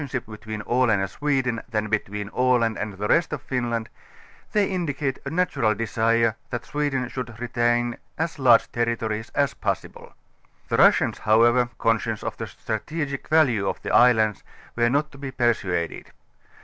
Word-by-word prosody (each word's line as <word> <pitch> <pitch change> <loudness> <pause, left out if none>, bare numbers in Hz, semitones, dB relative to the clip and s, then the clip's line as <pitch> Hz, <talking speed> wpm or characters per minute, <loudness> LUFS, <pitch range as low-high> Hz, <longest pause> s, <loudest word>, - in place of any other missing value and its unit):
<liip 135 -3 -4
l)etween 110 0 -7
Aland 120 -4 +2
and 95 - -2
Sweden 135 -5 0
than 110 -1 -1
between 105 -1 -2
Aland 125 -2 +2
and 105 0 -4
the 100 +2 -3
rest 165 +8 +2
of - - -3
Finland; 120 -3 -2 0.6
they 210 -1 +3
indicate 145 -7 -2
a - - -2
natural 150 - +1
desire, 115 +1 +1
that 120 - -4
Sweden 145 -4 -1
should 115 -3 -6
retain 120 0 0 0.2
as 160 -1 -3
large 120 -4 +5
territories 115 -2 -2
as 140 -2 +2
possible. - - -4 0.5
The - - +1
Russians - - +4
however, 120 +3 +4
concious 115 -1 0
of - - -3
the - - -5
strategic 140 +6 -4
value 125 -11 +3
of - - -4
the - - -3
islands, 110 -4 +4 0.3
were 120 0 +2
not 150 +3 0
to 135 - -14
be 140 -1 -5
persuaded. 110 -10 -1
120 Hz, 155 wpm, -24 LUFS, 110-135 Hz, 0.6 s, large